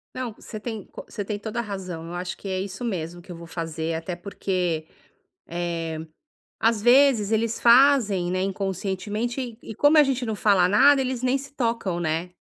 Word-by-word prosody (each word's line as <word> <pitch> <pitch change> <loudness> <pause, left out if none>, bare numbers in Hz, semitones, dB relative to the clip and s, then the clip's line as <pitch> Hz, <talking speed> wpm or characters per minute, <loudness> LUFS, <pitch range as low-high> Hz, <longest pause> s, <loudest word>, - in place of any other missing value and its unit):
Não, 255 -4 -4
você 215 -1 -9
tem 220 -3 -6
co - - -10
você 205 - -5
tem 205 +1 -3
toda 220 +2 -5
a - - +2
razão, 185 -6 -6
eu 170 - -7
acho 180 +1 -4
que 200 - -10
é 185 -1 -1
isso 195 +4 -5
mesmo 175 -5 -4
que 180 - -12
eu - - -6
vou 170 0 -10
fazer, 165 -1 -4
até 165 +2 -4
porque, 175 -3 -2 0.6
eh, 170 -2 -3 0.6
às 225 -2 +2
vezes, 245 -3 +5
eles 225 +1 0
fazem, 235 -7 +5
né, 185 +1 0
Inconscientemente, 195 +5 -2
e 240 -4 -5
e - - -8
como 290 +6 +5
a 300 - +9
gente 265 -3 -1
não 220 -2 -2
fala 195 -4 +4
nada, 275 +8 +6
eles 255 -2 -2
nem 255 +2 +2
se 275 +1 -10
tocam, 230 -9 -1
né. 165 +2 -2
200 Hz, 200 wpm, -25 LUFS, 175-235 Hz, 0.6 s, a